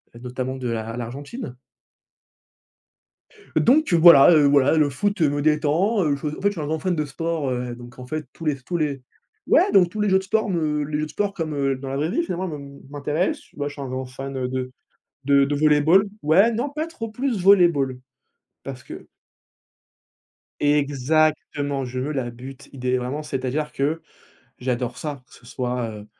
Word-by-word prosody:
heu, - - -11
notamment 130 +1 -4
de 130 -1 -4
l'A 115 0 -4
l'Argentine. 135 - -7 2.0
Donc 300 +4 +3
heu, 170 - +5
voilà, 165 -3 +9
heu, 155 -3 +5
voilà, 140 +2 +4
le 150 -2 +3
foot, 200 +9 -1
heu, 155 - +4
me 145 0 -2
détend, 155 +8 +2
heu, 145 -3 +1
je 140 - -8
en 150 - -5
fait, 200 - +2
je - - -4
suis 180 -6 -6
un 145 - -4
grand 160 +1 -1
fan 185 0 -1
de 155 -1 -1
sport, 160 0 -3
heu, 125 -1 -3
donc 120 0 -13
en 125 - -8
fait 155 +4 -4
tous 165 - -10
les 150 - +2
s 135 -2 -11
tous 175 - -2
les 145 -4 -2 0.5
ouais - - +4
donc 185 -3 +5
tous 215 - -7
les 210 - +1
jeux 190 0 +4
de - - -8
sport 220 +2 0
me 155 -4 0
les 150 +1 -3
jeux 155 - -1
de - - -10
sport 205 -1 -1
comme, 165 -5 -4
heu, 140 -1 0
dans 135 +1 -7
la 135 - -3
vraie 150 +3 0
vie 290 - +1
finalement 185 - -3
me 140 -3 -8
m'intéressent 150 +5 -2
moi 145 -1 -2
je 145 - -6
suis 145 - -9
un 135 - -5
grand 130 +1 -4
fan, 135 +1 -7
heu, 130 -1 -1
de 130 0 -4 0.5
de 140 0 +4
de 145 - -1
volley-ball. 155 +5 +4 0.2
Ouais, 190 +10 +4
non 235 +6 -1
pas 305 +3 -4
trop 255 -9 -6
plus 245 -1 -2
volley-ball, 170 -9 +4 0.7
parce 130 -2 -8
que - - -10 1.6
Exactement, 145 0 +1
je 125 +1 -5
veux 140 +4 -2
la 130 -5 -2
but. 130 +3 -11
Idéa 125 -1 -1
vraiment, 130 +5 -4
c'est-à-dire 140 +2 -3
que 150 +4 -1 0.6
j'adore 125 -1 -2
ça, 145 -4 -5
que - - -27
ce 120 - -18
soit, 125 -1 -3
heu, 105 -1 -10
145 Hz, 205 wpm, -23 LUFS, 130-165 Hz, 2.0 s, voilà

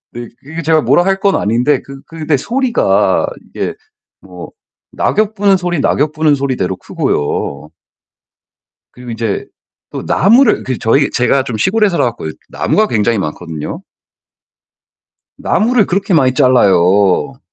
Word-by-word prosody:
네 120 -1 -8
그 160 +5 -7
이 - - -6
제가 160 0 +2
뭐라 175 - +3
할 195 0 0
건 200 -1 +2
아닌데 120 +7 +1
그 135 0 -12
그 160 -2 -8
네 150 - +3
소리가 245 - +1 0.2
이게 420 - -4 0.5
뭐 - - -11 0.4
낙엽 215 0 0
부는 200 -1 +3
소리 175 -4 -2
낙엽 150 +2 +1
부는 155 -1 +2
소리대로 125 -10 -2
크고요. 75 0 -3 1.2
그리고 125 -1 -10
인제 115 -3 -3 0.4
또 - - -6
나무를 235 +8 +3
그 130 -2 -3
저희 135 +5 +2
제가 130 +1 +1
좀 115 - -4
시골에 210 - +2
살아 175 - 0
갖고 120 -9 -4 0.2
나무가 215 - 0
굉장히 110 0 0
많거든요. 80 - -5 1.6
나무를 230 -2 +1
그렇게 195 0 -1
많이 130 -5 +3
잘라요. 100 - +3
140 Hz, 275 characters per minute, -14 LUFS, 115-190 Hz, 1.6 s, 뭐라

